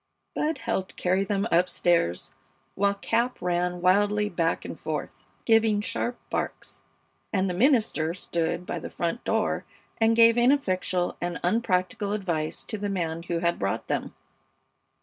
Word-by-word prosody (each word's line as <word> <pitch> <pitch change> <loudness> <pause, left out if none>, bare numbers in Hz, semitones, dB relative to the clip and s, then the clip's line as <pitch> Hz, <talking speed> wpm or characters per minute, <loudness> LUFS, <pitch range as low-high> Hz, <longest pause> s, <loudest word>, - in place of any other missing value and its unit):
Bud 310 +2 -1
helped 190 -5 -3
carry 185 +2 +1
them 200 +1 -1
up 180 +2 +4
stairs, 170 - +1 0.4
while 200 0 +1
Cap 235 +5 0
ran 180 0 -1
wildly 205 +3 +3
back 170 -3 -1
and - - -5
forth, - - -5 0.2
giving 225 -2 +4
sharp 235 +2 -2
barks, - - -4 0.5
and 195 -2 +1
the 180 - -1
minister 210 - +2
stood 170 -1 -2
by 175 - -3
the - - -7
front 170 +7 -3
door - - 0 0.4
and 225 0 +4
gave 230 +1 +6
ineffectual 185 -9 +1
and 175 -1 -2
unpractical 200 0 0
advice 170 -7 -2
to 215 - -5
the 205 0 -2
man 165 -4 -2
who 170 0 -3
had 170 - +1
brought 95 0 -2
them. - - -2
190 Hz, 150 wpm, -26 LUFS, 175-225 Hz, 0.5 s, gave